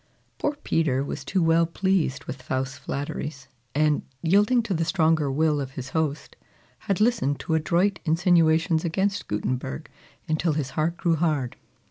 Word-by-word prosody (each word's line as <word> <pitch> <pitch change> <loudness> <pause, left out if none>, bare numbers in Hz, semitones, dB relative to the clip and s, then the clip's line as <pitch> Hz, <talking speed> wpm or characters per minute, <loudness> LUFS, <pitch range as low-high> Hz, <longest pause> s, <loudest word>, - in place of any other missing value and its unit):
Poor 295 - 0
Peter 140 -5 +1
was 140 0 -5
too 185 +5 0
well 165 0 +4
pleased 180 -5 0
with 130 0 -7
Faust's 130 +1 -2
flatteries, 140 -1 -5 0.3
and, 150 0 +2 0.2
yielding 210 +8 +4
to 215 - -2
the 165 -1 0
stronger 160 -4 +2
will 150 +1 +2
of 135 -1 -6
his 130 0 -6
host, 155 -1 -2 0.5
had 195 - +2
listened 215 - +2
to 165 - -3
adroit 175 +4 +2
insinuations 165 -1 +3
against 190 +4 -1
Gutenberg 105 - -3 0.4
until 155 +1 +1
his 145 -3 -2
heart 165 +2 -1
grew 170 -2 +1
hard. 150 -6 0
160 Hz, 150 wpm, -25 LUFS, 140-175 Hz, 0.5 s, well